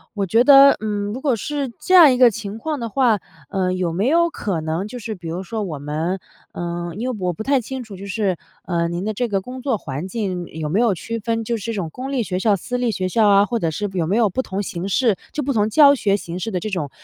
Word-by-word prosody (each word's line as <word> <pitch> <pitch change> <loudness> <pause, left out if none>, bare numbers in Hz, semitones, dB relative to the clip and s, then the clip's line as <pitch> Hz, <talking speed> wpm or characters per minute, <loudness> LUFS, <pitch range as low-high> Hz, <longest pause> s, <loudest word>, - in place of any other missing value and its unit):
我 200 -1 0
觉 225 +6 +3
得， 275 0 +9
嗯， 205 -1 -2
如 255 - -6
果 270 -4 +2
是 280 +3 -3
这 370 - -1
样 335 -6 +9
一 250 - +1
个 250 -2 +6
情 210 -1 -6
况 300 +4 -3
的 235 - -3
话， 235 -3 +2 0.3
呃， 185 -1 0
有 185 -2 -1
没 195 +7 0
有 340 +4 +3
可 195 - -3
能 160 +5 -2
就 245 - -8
是， 225 -2 -5
比 175 -3 -9
如 170 +3 -4
说 215 +3 -4
我 165 -7 -4
们 155 +6 -2 0.3
呃， 175 0 -4
因 235 +5 -3
为 255 - -3
我 180 -1 -1
不 195 - -6
太 275 +2 +2
清 255 +2 -6
楚， 215 -4 -10
就 195 - -8
是， 195 -2 -1 0.3
呃， 170 -2 0
您 170 +2 -3
的 215 +1 -2
这 245 +4 -1
个 200 -3 -1
工 255 +5 -8
作 255 -4 0
环 145 +1 -5
境 190 -4 -3
有 155 -1 -5
没 190 +7 +1
有 235 -3 +3
区 230 +6 -5
分 225 +1 -2
就 235 +1 -2
是 210 - -9
这 230 - -2
种 190 -6 -3
公 255 - -6
立 255 -4 +1
学 185 -3 -3
校、 205 +1 +3
私 250 +6 -4
立 245 -1 0
学 185 -2 -2
校 215 +2 +3
啊， 200 0 +5
或 235 +1 -2
者 165 - 0
是 205 +7 -3
有 170 -4 -1
没 190 - +1
有 225 -2 +3
不 260 - -1
同 200 -4 -4
形 180 -1 -4
式 220 0 +2 0.2
就 300 - -2
不 275 - -1
同 210 -2 +2
教 285 +4 +7
学 200 -6 +1
形 170 -1 -6
式 225 +4 -3
的 185 - -1
这 215 - -3
种 180 -8 -3
205 Hz, 300 characters per minute, -21 LUFS, 185-245 Hz, 0.3 s, 得